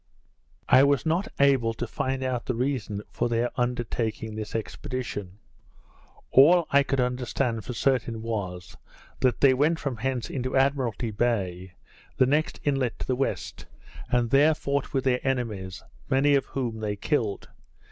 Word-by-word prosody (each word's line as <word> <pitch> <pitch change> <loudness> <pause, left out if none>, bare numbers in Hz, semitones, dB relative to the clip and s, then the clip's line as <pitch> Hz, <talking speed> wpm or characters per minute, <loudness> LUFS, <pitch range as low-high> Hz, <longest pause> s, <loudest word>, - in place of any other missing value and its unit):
I 130 +1 +7
was 140 +1 +2
not 170 +6 +1
able 130 -5 +3
to 120 - -3
find 130 +3 -2
out 125 -2 -2
the 125 - -1
reason 120 -5 -2
for - - -1
their 120 +1 0
undertaking 120 -2 -2
this 110 0 -6
expedition; 110 -4 -5 0.9
all 165 +6 +6
I 140 - +6
could 135 -1 -1
understand 125 -2 -1
for 125 - -4
certain 115 -3 0
was, 95 -6 -4 0.4
that 130 -1 +1
they 135 -2 +6
went 150 +5 +2
from 140 -6 -4
hence 125 +1 -2
into 130 -1 -2
Admiralty 130 -5 +1
Bay 95 -5 -1 0.4
(the 130 - +5
next 150 +4 0
inlet 135 -5 0
to - - -5
the 130 - 0
west), 135 +2 -3 0.4
and 120 -2 +1
there 150 +3 +5
fought 140 -1 -2
with 135 -2 0
their 125 -2 +2
enemies, 110 -8 -3 0.3
many 140 +1 +3
of 140 -1 +2
whom 120 -5 -3
they 105 -1 -2
killed. 110 -2 -1
125 Hz, 155 wpm, -26 LUFS, 115-135 Hz, 0.9 s, I